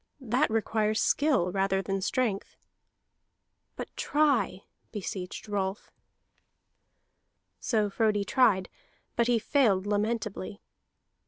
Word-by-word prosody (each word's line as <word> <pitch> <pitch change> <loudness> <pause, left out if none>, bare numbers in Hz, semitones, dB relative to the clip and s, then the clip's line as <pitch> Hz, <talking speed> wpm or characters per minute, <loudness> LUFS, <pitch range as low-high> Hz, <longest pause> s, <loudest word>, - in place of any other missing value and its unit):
That 260 +3 +1
requires 220 -1 0
skill 275 - +2
rather 195 0 +1
than 195 0 -2
strength." 205 0 -1 1.2
"But - - -7
try!" 290 -9 +1 0.3
beseeched 190 -2 -5
Rolf. 200 -1 -3 1.7
So 215 -4 +1
Frodi 205 0 +1
tried, 205 -8 +3 0.5
but 235 - +2
he 240 -1 +3
failed 215 -6 +2
lamentably. 210 -1 -2
210 Hz, 90 wpm, -29 LUFS, 195-235 Hz, 1.7 s, tried